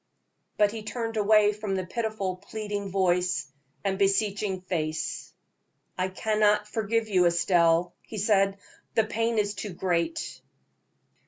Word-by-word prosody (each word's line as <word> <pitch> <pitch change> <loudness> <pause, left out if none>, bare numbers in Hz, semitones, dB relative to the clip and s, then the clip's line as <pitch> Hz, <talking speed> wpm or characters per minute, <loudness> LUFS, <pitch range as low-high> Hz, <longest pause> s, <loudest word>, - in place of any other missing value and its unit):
But 210 -1 +4
he 225 0 -6
turned 225 +1 -4
away 210 0 +4
from 210 -2 -3
the 185 -1 -2
pitiful, 210 -2 -2
pleading 205 0 -5
voice 180 -6 +1 0.4
and 195 -1 -1
beseeching 195 -1 +1
face. 160 -4 -3 0.6
"I 185 0 0
cannot 210 +2 +2
forgive 220 +1 -1
you, 185 -4 +4
Estelle," 170 0 +3
he 220 - -9
said; 195 -1 +2 0.4
"the 225 - +5
pain 225 +1 -1
is 205 -1 +1
too 205 -2 -6
great." 185 - -1
200 Hz, 130 wpm, -27 LUFS, 185-215 Hz, 0.6 s, the